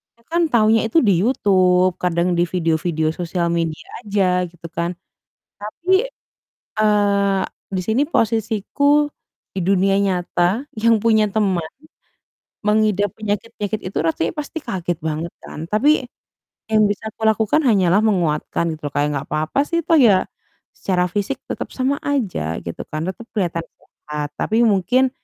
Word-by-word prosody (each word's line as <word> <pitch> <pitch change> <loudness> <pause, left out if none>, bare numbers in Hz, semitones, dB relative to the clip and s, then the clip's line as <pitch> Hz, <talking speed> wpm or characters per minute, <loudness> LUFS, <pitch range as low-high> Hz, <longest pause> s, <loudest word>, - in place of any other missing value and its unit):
kita 230 - -30
kan 340 - +2
taunya 220 -1 +4
itu 275 - +3
di 200 - +5
YouTube, 185 -5 +3
kadang 175 0 +1
di 175 - +4
video-video 165 -2 0
sosial 175 0 -1
media 165 -2 -3 0.2
aja, 200 -2 +1 0.2
gitu 170 -1 -11
kan. 170 +1 0 0.7
Tapi, 370 - 0 0.7
eee, 200 -2 +2 0.3
di 185 - 0
sini 225 +5 +2
posisiku 230 - +1 0.5
di 190 - -2
dunia 195 +1 +3
nyata 185 +4 0
yang 230 0 +4
punya 220 -2 +4
teman 195 -6 0 1.0
mengidap 210 -2 +2
penyakit-penyakit 210 0 -3
itu 190 - -5
rasanya 165 0 -1
pasti 300 +1 -6
kaget 180 -7 -3
banget 160 +1 -2
kan. 160 +2 -8
Tapi 270 +9 +3 0.7
yang 215 -1 +4
bisa 215 +2 -3
aku - - -24
lakukan 220 +7 +2
hanyalah 195 -4 +4
menguatkan, 170 -4 0
gitu 150 -2 -6
loh. - - -6
Kayak, 145 0 +2
"Enggak 140 0 -4
papa 155 - -1
sih, 335 - 0
toh 330 - +4
ya, 210 -8 +5 0.5
secara 180 -2 0
fisik 205 +8 -2
tetap - - -4
sama 270 +2 0
aja, 195 - -1
gitu 85 -1 -6
kan, 155 0 -4
tetap 190 +5 -8
kelihatan 170 -5 -1
sehat. 150 -1 -7
Tapi 220 +2 +1
mungkin 220 +6 +2
200 Hz, 145 wpm, -20 LUFS, 175-220 Hz, 1.0 s, di